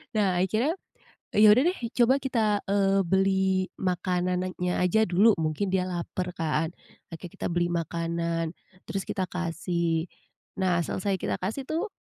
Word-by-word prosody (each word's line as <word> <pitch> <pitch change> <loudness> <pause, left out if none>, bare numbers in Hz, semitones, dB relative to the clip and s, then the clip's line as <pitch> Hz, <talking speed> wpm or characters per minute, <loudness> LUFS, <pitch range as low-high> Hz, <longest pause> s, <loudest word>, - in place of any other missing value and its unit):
Nah, 185 -4 +2
akhirnya, 220 - +1 0.6
ya 210 +1 +5
udah 255 +5 +4
deh 370 - -4 0.2
coba 260 +3 +5
kita, 225 -6 +1
eee, 195 -1 +2
beli 190 0 +2
makanannya 180 0 -1
aja 220 +5 +3
dulu 195 +4 +4
mungkin 160 +5 -1
dia 185 -1 +1
lapar 180 0 -4
kan, 160 +1 -1 0.4
oke 165 - -8
kita - - -7
beli 175 0 0
makanan, 170 0 -2 0.4
terus 195 -1 -3
kita 195 -4 -3
kasih. 170 -1 -1 0.5
Nah, 180 -2 +2
selesai 190 +2 -2
kita - - -1
kasih 215 +9 -3
tuh, 350 +7 -2
185 Hz, 140 wpm, -27 LUFS, 170-200 Hz, 0.6 s, ya